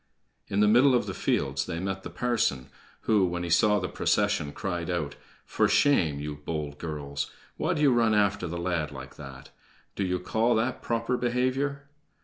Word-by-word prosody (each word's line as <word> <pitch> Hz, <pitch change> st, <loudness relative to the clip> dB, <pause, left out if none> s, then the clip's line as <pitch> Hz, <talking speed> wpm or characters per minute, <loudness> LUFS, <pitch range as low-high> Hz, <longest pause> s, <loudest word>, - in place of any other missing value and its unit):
In 100 Hz, -, 0 dB
the 105 Hz, -, +5 dB
middle 125 Hz, +5 st, +6 dB
of 120 Hz, -, +1 dB
the -, -, -4 dB
fields 70 Hz, -1 st, -1 dB
they 85 Hz, -2 st, -3 dB
met 95 Hz, +1 st, -3 dB
the -, -, -7 dB
parson, 110 Hz, -, -1 dB, 0.3 s
who, 105 Hz, -3 st, +3 dB
when 85 Hz, 0 st, -3 dB
he 85 Hz, -, -3 dB
saw 105 Hz, +5 st, +4 dB
the 90 Hz, -, -2 dB
procession, 75 Hz, -3 st, 0 dB
cried 85 Hz, 0 st, -4 dB
out: 80 Hz, -5 st, -2 dB, 0.3 s
"For -, -, +1 dB
shame, 85 Hz, -, +3 dB
you 75 Hz, 0 st, -5 dB
bold 75 Hz, -1 st, -5 dB
girls! 70 Hz, -3 st, -4 dB, 0.3 s
Why 175 Hz, +3 st, 0 dB
do 150 Hz, -, 0 dB
you 140 Hz, -3 st, +5 dB
run 115 Hz, -2 st, +3 dB
after 100 Hz, -3 st, +1 dB
the 85 Hz, +1 st, -4 dB
lad 85 Hz, -3 st, -1 dB
like 70 Hz, -1 st, -9 dB
that? 70 Hz, -2 st, -10 dB, 0.4 s
Do 100 Hz, -, -1 dB
you 90 Hz, -1 st, 0 dB
call 110 Hz, +6 st, +1 dB
that 120 Hz, +3 st, -1 dB
proper 115 Hz, +2 st, -1 dB
behavior?" 130 Hz, +4 st, 0 dB
90 Hz, 185 wpm, -27 LUFS, 75-120 Hz, 0.4 s, middle